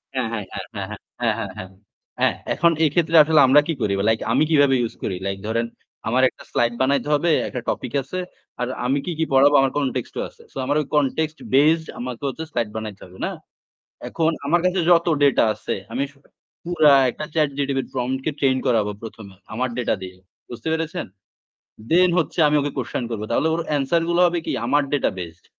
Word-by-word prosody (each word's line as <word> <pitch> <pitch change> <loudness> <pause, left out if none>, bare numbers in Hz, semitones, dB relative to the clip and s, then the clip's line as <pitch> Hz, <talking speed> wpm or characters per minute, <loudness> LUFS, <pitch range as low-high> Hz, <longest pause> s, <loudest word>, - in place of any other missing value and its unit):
হ্যাঁ, 130 -3 0
হ্যাঁ, 105 - -3 0.3
হ্যাঁ, - - -4 0.5
হ্যাঁ, - - -4
হ্যাঁ। 95 - -7 0.5
হ্যাঁ - - +3 0.2
এখন 170 0 +3
এক্ষেত্রে 165 +2 +1
আসলে 155 0 +3
আমরা 145 +3 +7
কি 165 - 0
করি 105 -2 +1 0.2
লাইক 110 0 +2
আমি - - +4
কিভাবে 145 -3 +5
ইউজ 115 - -2
করি 95 - -2
লাইক 100 0 -2
ধরেন 115 +1 0 0.4
আমার 125 +4 +2
একটা - - -16
স্লাইড 120 0 +1
বানাইতে 140 +2 +1
হবে, 170 +4 +1 0.2
একটা 125 - -5
টপিক 125 - -3
আছে। 185 +8 -6 0.4
আর 125 - 0 0.2
আমি 135 +3 +2
কি, 180 - -2
কি 160 - +2
পড়াবো 140 +2 +6
আমার 135 -1 +2
কনটেক্সট 130 -4 -2
ও - - 0
আছে। - - -21
সো - - -10
আমার 145 - 0
ওই 150 - -7
কনটেক্সট 155 +2 0 0.2
বেসড 160 +4 +4
আমাকে 125 -1 -5
হচ্ছে 160 +4 -6
স্লাইড 115 -3 -1
বানাইতে 110 -3 -6
হবে 90 +1 -15
না? - - -1 0.8
এখন 165 -1 +1 0.2
আমার 170 +4 +3
কাছে 185 +1 +1
যত 170 -1 +5 0.2
ডেটা 140 - +4
আছে 105 - -4 0.2
আমি 130 - -1 0.6
পুরা 170 -3 +4 0.2
একটা 150 - -6
চ্যাট 155 -3 +2
জিটিটি 140 -1 0
প্রম্পট 130 +1 -1
কে - - +1
ট্রেইন 135 -2 +3
করাবো 110 -5 +2
প্রথমে 110 -3 -10 0.2
আমার 125 +3 -1
ডেটা 120 - +1
দিয়ে। 95 0 -8 0.3
বুঝতে 120 +3 -6
পেরেছেন? 160 -1 -2 0.8
দেন 180 +2 +5
হচ্ছে 165 +1 -2
আমি 150 - +2
ওকে 145 0 -2
কুয়েসশন 125 -1 -3
করব। 110 -2 -4
তাহলে 145 +7 +2
ওর 165 - -1
অ্যানসার 150 +3 +1
গুলো 170 +1 +2
হবে 175 0 0
কি - - -1
আমার 145 +3 +3
ডেটা 145 - +2
বেসড। 85 -1 -8
135 Hz, 195 wpm, -22 LUFS, 120-155 Hz, 0.8 s, আমরা